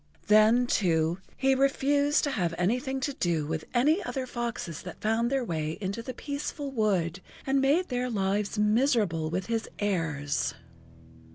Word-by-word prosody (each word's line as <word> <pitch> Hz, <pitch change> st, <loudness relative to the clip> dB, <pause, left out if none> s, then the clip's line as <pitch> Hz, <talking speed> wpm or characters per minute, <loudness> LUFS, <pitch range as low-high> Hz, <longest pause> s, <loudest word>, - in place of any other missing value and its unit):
Then, 215 Hz, +4 st, +5 dB
too, 170 Hz, -6 st, +1 dB, 0.2 s
he 270 Hz, 0 st, +3 dB
refused 285 Hz, +2 st, +2 dB
to 285 Hz, -, 0 dB
have 175 Hz, -8 st, -1 dB
anything 250 Hz, +9 st, 0 dB
to 280 Hz, +2 st, -1 dB
do 170 Hz, -, 0 dB
with 160 Hz, +1 st, -3 dB
any 300 Hz, +10 st, +3 dB
other 265 Hz, -2 st, -3 dB
foxes 235 Hz, -10 st, -4 dB
that -, -, -9 dB
found 225 Hz, +2 st, +1 dB
their 270 Hz, -2 st, 0 dB
way 155 Hz, -4 st, -3 dB
into 200 Hz, +3 st, -3 dB
the 255 Hz, -, -6 dB
peaceful 285 Hz, +2 st, -5 dB
wood, 190 Hz, -7 st, 0 dB, 0.2 s
and 270 Hz, 0 st, +2 dB
made 305 Hz, +7 st, +2 dB
their 250 Hz, 0 st, -1 dB
lives 205 Hz, 0 st, -1 dB
miserable 210 Hz, -, +2 dB
with 180 Hz, +3 st, -2 dB
his 225 Hz, -1 st, -2 dB
airs. 160 Hz, -8 st, -1 dB
225 Hz, 155 wpm, -28 LUFS, 175-265 Hz, 0.2 s, Then